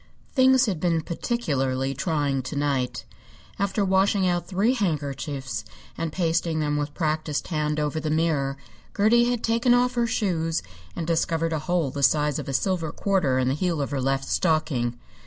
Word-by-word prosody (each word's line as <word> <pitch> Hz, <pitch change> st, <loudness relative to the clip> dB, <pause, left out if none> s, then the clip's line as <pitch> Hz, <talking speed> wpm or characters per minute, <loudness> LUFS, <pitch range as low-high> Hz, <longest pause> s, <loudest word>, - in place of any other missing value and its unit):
Things 260 Hz, -1 st, +5 dB
had 190 Hz, -8 st, -2 dB
been 165 Hz, -1 st, +1 dB
particularly 135 Hz, -, -1 dB
trying 140 Hz, -1 st, 0 dB
to 130 Hz, +4 st, -6 dB
night. 140 Hz, -3 st, -1 dB, 0.5 s
After 200 Hz, +1 st, +1 dB
washing 190 Hz, 0 st, +3 dB
out 175 Hz, -1 st, 0 dB
three 200 Hz, +6 st, +2 dB
handkerchiefs 140 Hz, -, -2 dB, 0.3 s
and 165 Hz, -1 st, -3 dB
pasting 165 Hz, -1 st, 0 dB
them 150 Hz, -1 st, 0 dB
with 145 Hz, 0 st, -3 dB
practised 155 Hz, -2 st, -1 dB
hand 150 Hz, -2 st, -1 dB
over 150 Hz, +1 st, -1 dB
the 155 Hz, 0 st, -3 dB
mirror, 150 Hz, -4 st, 0 dB, 0.4 s
Gertie 235 Hz, +4 st, +4 dB
had 245 Hz, -2 st, -1 dB
taken 235 Hz, +2 st, +3 dB
off 250 Hz, 0 st, +2 dB
her 240 Hz, -1 st, +1 dB
shoes 165 Hz, -, 0 dB, 0.3 s
and 165 Hz, -, -3 dB
discovered 165 Hz, 0 st, 0 dB
a 160 Hz, -, 0 dB
hole 160 Hz, -2 st, 0 dB
the 140 Hz, -, -4 dB
size 150 Hz, 0 st, +3 dB
of -, -, -6 dB
a -, -, -1 dB
silver 170 Hz, 0 st, 0 dB
quarter 180 Hz, -11 st, +1 dB
in 130 Hz, -1 st, +1 dB
the 130 Hz, -, +2 dB
heel 170 Hz, +1 st, -1 dB
of 140 Hz, -, -2 dB
her 140 Hz, -2 st, -1 dB
left 135 Hz, +1 st, 0 dB
stocking. 155 Hz, -9 st, 0 dB
160 Hz, 175 wpm, -25 LUFS, 140-190 Hz, 0.5 s, Things